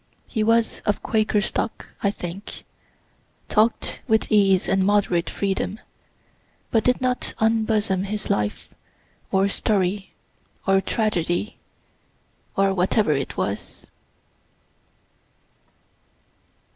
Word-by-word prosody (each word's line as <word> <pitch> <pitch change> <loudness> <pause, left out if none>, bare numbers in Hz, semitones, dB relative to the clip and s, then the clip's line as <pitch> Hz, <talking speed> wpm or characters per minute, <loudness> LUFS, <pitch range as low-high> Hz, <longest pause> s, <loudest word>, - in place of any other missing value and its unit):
He 220 -3 -1
was 230 +1 +2
of 205 - 0
Quaker 215 -1 +2
stock, 220 +2 -3
I 200 - +2
think; 190 0 -6 0.9
talk'd 220 +2 +2
with 220 -2 +2
ease 195 -3 +4
and 190 0 +2
moderate 190 -4 +2
freedom, 195 +1 -2 0.9
but 225 -2 +3
did 250 0 +2
not 250 -1 -1
unbosom 220 -3 +1
his 210 +1 -4
life, 105 0 -2 0.6
or 190 +1 +3
story, 195 -1 0 0.6
or 195 0 +4
tragedy, 190 -2 -1 1.0
or 195 0 +3
whatever 190 0 +2
it 140 -2 -2
was. 100 +2 -4
200 Hz, 95 wpm, -23 LUFS, 190-220 Hz, 1.0 s, ease